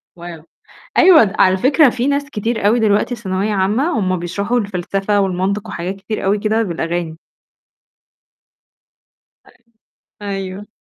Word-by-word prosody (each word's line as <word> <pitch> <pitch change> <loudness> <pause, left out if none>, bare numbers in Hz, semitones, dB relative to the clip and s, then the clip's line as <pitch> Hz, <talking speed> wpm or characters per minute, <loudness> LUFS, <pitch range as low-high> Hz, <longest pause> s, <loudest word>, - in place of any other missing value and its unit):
واو! 170 -2 -10 0.6
أيوه 320 - +6
على 185 0 +4
فكرة 275 - +4
في 250 +2 -2
ناس 285 0 0
كتير 220 -2 -2
أوي 230 +3 +3
دلوقتي 210 +3 +1
ثانوية 200 -1 -2
عامّة، 220 - 0
هُم 185 -2 0
بيشرحوا 200 +7 -2
الفلسفة 200 +1 -1
والمنطق 195 +3 -1
وحاجات 180 +3 -5
كتير 195 +3 -5
أوي 200 +2 +1
كده 220 +2 0
بالأغاني. 170 -3 -3 2.3
أيوه، - - -22 0.7
أيوه. 195 0 -5
200 Hz, 120 wpm, -17 LUFS, 185-225 Hz, 2.3 s, أيوه